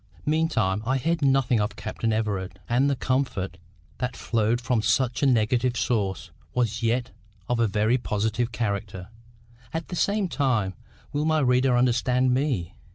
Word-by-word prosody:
Meantime 145 - +1
I 130 +4 +1
heard 165 +5 0
nothing 135 -4 +3
of 105 +1 -1
Captain 115 - -3
Everard; 100 -4 -2
and 130 +4 +2
the 140 - +1
comfort 125 -9 -1 0.4
that 125 -1 -3
flowed 115 +1 +1
from 120 -1 0
such 120 +3 +1
a 140 - +4
negative 120 +1 +2
source 95 -7 -1 0.2
was 120 -2 0
yet 115 +1 0 0.4
of 120 -1 0
a 115 - +3
very 110 +5 +2
positive 110 +2 -1
character. 100 -4 -3 0.6
At 165 0 -4
the 180 - -4
same 200 +2 +1
time—will 130 - -2
my 155 0 +2
reader 125 -2 +3
understand 125 +1 +2
me? 125 - -1
120 Hz, 150 wpm, -25 LUFS, 105-130 Hz, 0.6 s, a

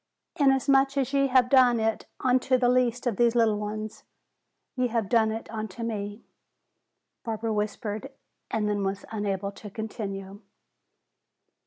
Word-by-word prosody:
'Inasmuch 275 -1 +3
as 270 0 0
ye 275 0 +3
have 255 -2 +4
done 250 -3 +5
it 220 0 -1
unto 255 0 +3
the 245 -1 +2
least 245 -1 +1
of 235 -5 0
these 235 0 +3
little 220 -3 +3
ones, 215 +1 -5 0.7
ye 255 -1 +1
have 230 -3 -1
done 220 0 +3
it 225 +1 -5
unto 220 0 -5
me,'" 205 -1 -4 1.0
Barbara 225 -1 -2
whispered, 210 +4 -3 0.4
and 215 -1 0
then 205 -1 0
was 195 0 -3
unable 200 -2 -2
to 210 +1 -10
continue. 200 -2 -6
225 Hz, 140 wpm, -27 LUFS, 210-250 Hz, 1.0 s, done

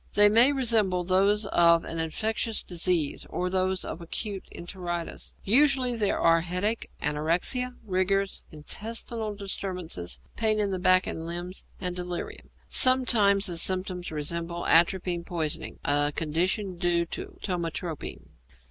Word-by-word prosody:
They 205 0 +8
may 235 +6 +5
resemble 220 -9 +2
those 200 +4 +3
of 170 -3 +4
an 165 - -5
infectious 220 +7 -1
disease 170 -3 -1
or 180 0 -3
those 185 0 0
of 170 - -6
acute 195 +3 -5
enteritis. 175 -1 -6
Usually 260 +2 +3
there 210 -3 0
are 165 0 +4
headache, 180 +6 -2
anorexia, 170 - 0
rigors, 195 0 0
intestinal 215 +7 -5
disturbance, 180 - -4 0.2
pains 215 -1 +2
in 205 -2 0
the 185 - -2
back 185 +1 +4
and 160 0 -5
limbs, 175 +2 -4
and 180 -1 -4
delirium. 180 -1 -5 0.2
Sometimes 225 -6 +5
the 175 -4 +2
symptoms 185 -1 0
resemble 170 +3 -3
atropine 175 +1 +2
poisoning, 160 -2 -4
a 145 0 +2
condition 175 +5 -1
due 175 -1 +1
to 375 - -8
ptomatropine. 170 -3 -4
185 Hz, 130 wpm, -27 LUFS, 170-210 Hz, 0.2 s, They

